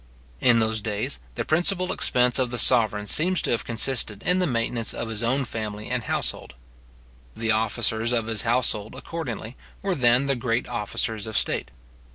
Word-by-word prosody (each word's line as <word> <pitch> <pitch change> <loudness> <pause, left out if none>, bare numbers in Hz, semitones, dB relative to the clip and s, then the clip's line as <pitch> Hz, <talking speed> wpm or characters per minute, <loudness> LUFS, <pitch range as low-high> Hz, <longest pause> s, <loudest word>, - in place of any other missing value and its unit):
In 120 - +4
those 110 -1 +1
days 100 - -2 0.2
the - - -3
principal 180 +3 +1
expense 125 -7 +2
of 130 -2 +1
the 120 - -4
sovereign 110 -5 +5
seems 175 - +2
to - - 0
have 115 -3 0
consisted 115 -3 0
in 180 +2 +2
the 180 - +1
maintenance 115 -2 -1
of 115 - -4
his 110 -1 -2
own 130 +4 0
family 110 -1 -6
and 125 -3 -2
household. 70 - -3 0.8
The 110 -1 0
officers 110 +1 0
of 115 -2 0
his 110 -2 0
household, 115 -2 0
accordingly, 130 -6 -6 0.3
were 195 -1 0
then 125 -3 +3
the 140 -1 +1
great 120 0 -1
officers 110 -1 -2
of 110 - -2
state. - - 0
115 Hz, 175 wpm, -24 LUFS, 110-130 Hz, 0.8 s, sovereign